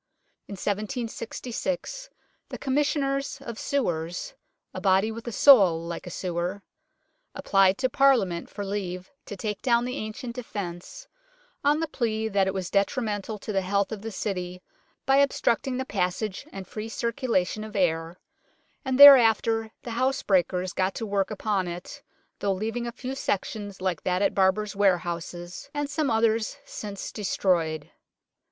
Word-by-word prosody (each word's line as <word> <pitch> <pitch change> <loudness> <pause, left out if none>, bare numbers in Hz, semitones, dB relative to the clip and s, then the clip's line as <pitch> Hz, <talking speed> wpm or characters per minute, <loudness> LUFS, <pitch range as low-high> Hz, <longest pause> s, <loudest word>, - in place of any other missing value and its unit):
In - - -7
1766 235 - -4 0.4
the - - -6
Commis 285 +1 +1
sioners 275 -1 -1
of 235 -4 -7
Sewers 175 - -2 0.4
(a - - -5
body 195 +2 +3
with 230 +2 -8
a - - -2
soul 200 - +7
like 170 +2 -6
a - - -4
sewer) 180 +2 -3 0.7
applied 195 -8 +3
to 260 - +1
Parliament 235 -10 +2
for 205 -1 -6
leave 185 -2 -4 0.2
to 205 - -7
take 210 +1 -4
down 240 -2 +2
the 250 +2 -3
ancient 235 +3 -5
defence, 205 - -7 0.6
on 295 +2 +3
the 325 - 0
plea 220 -6 -1
that 195 -2 +2
it 190 - 0
was 185 -2 -3
detrimental 205 +1 0
to 210 +1 -6
the 195 - +2
health 200 +2 0
of 215 -2 -5
the 225 - -5
City 180 -3 -4 0.4
by 270 0 +4
obstructing 265 -2 +2
the 260 - -2
passage 190 -1 -2
and 195 -1 -7
free 215 +3 -6
circulation 230 -4 -1
of 215 0 -9
air, 165 -2 0 0.6
and 265 -1 -1
thereafter 225 -5 +8
the 240 - -6
housebreakers 190 -8 +1
got 190 0 0
to 225 - -3
work 200 -2 0
upon 205 -3 -1
it, 175 +1 -7 0.4
though 200 -1 +1
leaving 225 +5 -3
a - - -3
few 255 +2 -6
sections 205 -5 -3
like 185 -4 -1
that 185 +1 0
at - - +2
Barber's 195 +2 +2
Ware 195 -2 +4
houses 175 +5 -6
and 290 0 -1
some 285 0 -1
others 225 -1 +1
since 205 -2 -6
destroyed. 170 -7 0
210 Hz, 155 wpm, -26 LUFS, 185-245 Hz, 0.7 s, thereafter